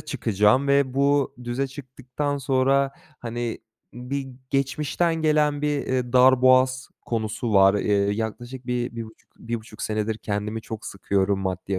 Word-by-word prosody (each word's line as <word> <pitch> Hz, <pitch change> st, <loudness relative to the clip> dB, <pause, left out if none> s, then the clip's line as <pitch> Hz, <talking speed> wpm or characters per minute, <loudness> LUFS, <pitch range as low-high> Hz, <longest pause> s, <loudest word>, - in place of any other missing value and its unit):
çıkacağım 115 Hz, +1 st, +1 dB
ve 140 Hz, -2 st, +2 dB
bu 140 Hz, 0 st, +2 dB
düze 120 Hz, +3 st, -1 dB
çıktıktan 135 Hz, +1 st, -5 dB
sonra, 135 Hz, +1 st, +2 dB, 0.3 s
hani, 120 Hz, 0 st, -4 dB, 0.4 s
bir 135 Hz, +3 st, -4 dB, 0.2 s
geçmişten 140 Hz, +5 st, 0 dB
gelen 150 Hz, -2 st, +1 dB
bir, 150 Hz, -1 st, +1 dB
eee, 125 Hz, -2 st, -1 dB
darboğaz 130 Hz, 0 st, +5 dB, 0.2 s
konusu 110 Hz, 0 st, -2 dB
var. 95 Hz, 0 st, +6 dB
Eee, 105 Hz, 0 st, 0 dB, 0.2 s
yaklaşık 120 Hz, +4 st, -5 dB
1 120 Hz, -1 st, -2 dB
bir 115 Hz, -, -3 dB
buçuk 110 Hz, 0 st, -17 dB
bir 115 Hz, 0 st, -5 dB
buçuk 110 Hz, -1 st, -10 dB
senedir 110 Hz, 0 st, -2 dB
kendimi 105 Hz, +1 st, -3 dB
çok 110 Hz, 0 st, -7 dB
sıkıyorum 95 Hz, 0 st, 0 dB
maddi 95 Hz, 0 st, -3 dB
125 Hz, 140 wpm, -24 LUFS, 110-135 Hz, 0.4 s, var